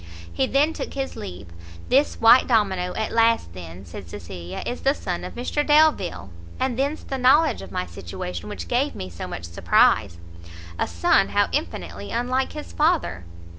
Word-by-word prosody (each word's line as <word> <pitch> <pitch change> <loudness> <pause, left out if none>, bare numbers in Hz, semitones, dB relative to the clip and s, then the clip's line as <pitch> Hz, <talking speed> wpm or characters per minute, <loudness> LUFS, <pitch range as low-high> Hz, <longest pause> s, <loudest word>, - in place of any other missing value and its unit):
He 265 - +1
then 290 +5 +2
took - - -6
his 270 -1 -3
leave. 90 +2 -8 0.4
"This 275 +3 +2
white 230 +3 +7
domino, 190 -6 +1
at 220 - -2
last 230 - +2
then," 90 +1 -10
said 85 +1 -10
Cecilia, 85 +1 -7
"is 245 - -4
the 275 +2 +2
son 180 -9 -4
of - - -7
Mr 250 +5 -1
Delvile! 295 - +2 0.3
and 260 -1 0
thence 280 +5 -1
the 270 - -4
knowledge 295 +6 +4
of - - -10
my 180 0 -2
situation 85 0 -7
which 85 -2 -6
gave - - 0
me 95 -1 -6
so 85 - -7
much 85 - -6
surprise: 85 +2 +2 0.6
a - - +1
son 85 -1 +2
how - - +2
infinitely 90 +3 -4
unlike 255 +2 -1
his 300 - -8
father!" 305 - +1
205 Hz, 170 wpm, -23 LUFS, -, 0.6 s, white